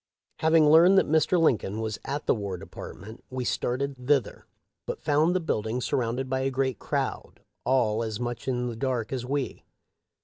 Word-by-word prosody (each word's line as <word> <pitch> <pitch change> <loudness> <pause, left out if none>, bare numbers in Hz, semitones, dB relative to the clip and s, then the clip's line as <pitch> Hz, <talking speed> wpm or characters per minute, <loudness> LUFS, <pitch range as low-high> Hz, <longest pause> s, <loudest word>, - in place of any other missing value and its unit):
Having 160 -1 +5
learned 170 +5 +7
that - - +4
Mr. 160 +3 +3
Lincoln 110 -9 +1
was 110 -1 -3
at 145 +1 -4
the - - +4
War 100 -4 -4
Department 110 +5 -10
we 130 -1 -4
started 125 +1 -2
thither, 140 -3 +1 0.4
but - - -5
found 155 +4 +3
the - - +3
building 115 -7 -2
surrounded 125 +1 -1
by 130 0 -1
a 135 +1 0
great 130 -3 -1
crowd, - - -3 0.2
all 115 -4 +2
as 110 -2 -3
much 120 0 -4
in 125 -1 0
the 120 -2 -4
dark 125 -2 -2
as 125 -2 -3
we. 140 0 -3
130 Hz, 175 wpm, -27 LUFS, 115-145 Hz, 0.4 s, learned